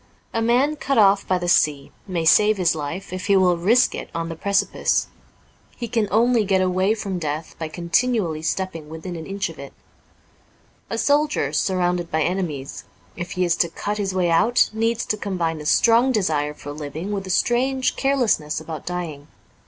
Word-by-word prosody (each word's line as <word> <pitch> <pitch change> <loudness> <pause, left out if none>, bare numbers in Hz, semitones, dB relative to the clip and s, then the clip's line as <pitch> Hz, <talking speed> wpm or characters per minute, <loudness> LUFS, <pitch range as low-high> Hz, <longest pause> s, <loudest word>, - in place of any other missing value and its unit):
A 230 - 0
man 255 +6 +2
cut 275 -1 -1
off 200 -2 +4
by 185 - +2
the 175 0 -4
sea 150 -5 +2 0.2
may 175 -4 -2
save 210 +5 +5
his 180 -3 +2
life 165 +5 -5
if 185 +1 -5
he 200 -1 +4
will 180 -2 +4
risk 215 +9 +3
it - - -6
on 165 0 -3
the 165 - -5
precipice. 200 +4 +1 0.7
He 240 - -4
can 225 -2 0
only 235 +1 +3
get 190 -1 +2
away 185 +3 +1
from 195 -4 -4
death 155 0 -4
by 160 - -3
continually 170 +1 0
stepping 165 -2 -3
within 160 +3 -7
an 160 -1 -7
inch 195 0 -2
of 165 - -12
it, 140 0 -9 1.2
A 225 - -3
soldier, 295 +4 +1
surrounded 180 -2 0
by 160 0 0
enemies, 165 -7 -3 0.3
if 175 +1 -6
he 180 0 0
is 175 - +2
to 170 - +2
cut 205 +5 -4
his 195 -2 -1
way 180 -2 +1
out, 225 +9 +3
needs 225 +1 0
to 215 - -1
combine 170 -6 -2
a 150 - -5
strong 235 +7 +4
desire 155 - 0
for 145 - -8
living 150 +6 -6
with 195 -2 -3
a - - -7
strange 255 +6 +1
carelessness 245 - +1
about 160 -1 -8
dying. 165 -5 -5
185 Hz, 185 wpm, -22 LUFS, 165-215 Hz, 1.2 s, save